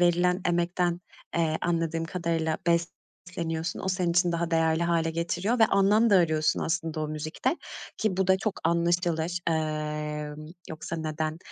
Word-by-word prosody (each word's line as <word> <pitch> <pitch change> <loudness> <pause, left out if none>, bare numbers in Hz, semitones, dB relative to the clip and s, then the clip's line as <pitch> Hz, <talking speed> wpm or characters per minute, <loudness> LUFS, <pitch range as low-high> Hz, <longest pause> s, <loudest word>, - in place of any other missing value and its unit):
verilen 175 +1 +3
emekten, 175 0 0 0.4
eee, 160 -2 +1
anladığım 165 -1 0
kadarıyla 165 -2 -1
besleniyorsun. 170 0 -2
O - - -3
senin 180 -2 +1
için 175 0 +3
daha 170 0 -1
değerli 165 0 +2
hâle 170 -1 +1
getiriyor 175 +8 -1
ve 225 - +7
anlam 210 +3 +4
da 200 - +7
arıyorsun 155 -3 +2
aslında 160 -1 -2
o 155 - -2
müzikte 155 - -2 0.4
ki 215 -4 0
bu 190 0 +1
da 190 0 +5
çok 205 +1 -3
anlaşılır. 170 0 +1
Emm, 150 -1 -3 0.2
yoksa 160 +1 -5
neden 155 0 -3
170 Hz, 145 wpm, -27 LUFS, 160-175 Hz, 0.4 s, ve